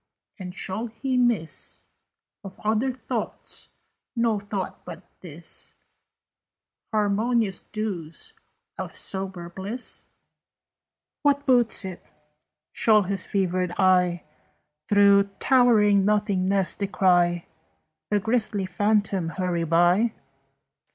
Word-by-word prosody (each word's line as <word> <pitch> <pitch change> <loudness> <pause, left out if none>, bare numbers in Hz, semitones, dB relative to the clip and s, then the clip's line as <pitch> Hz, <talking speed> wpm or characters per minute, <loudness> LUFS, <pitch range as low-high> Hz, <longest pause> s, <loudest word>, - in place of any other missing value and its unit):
And 180 -1 -7
shall 195 +6 -4
he 255 +4 -3
miss 235 -10 -1 0.6
Of 195 -1 -10
other 220 +5 +1
thoughts 255 - -5 0.5
no 230 -3 +1
thought 200 -1 -5
but - - -9 0.2
this, - - -6 1.1
Harmonious 215 -1 +1
dews 190 -7 -5 0.5
of - - -5
sober 190 -3 -4
bliss? 195 +8 -7 1.2
"What 285 -1 +2
boots 245 -6 +4
it? 185 -2 -7 0.7
Shall 215 -2 +4
his 195 0 -3
fevered 185 -2 0
eye 180 -2 +3 0.7
Through 200 -1 +6
towering 220 -6 +4
nothingness 200 -2 +1
descry 175 -3 +2 0.6
The 210 - +2
grisly 220 -2 0
phantom 200 -1 0
hurry 175 -1 -1
by? 175 +7 +3
200 Hz, 90 wpm, -25 LUFS, 185-220 Hz, 1.2 s, Through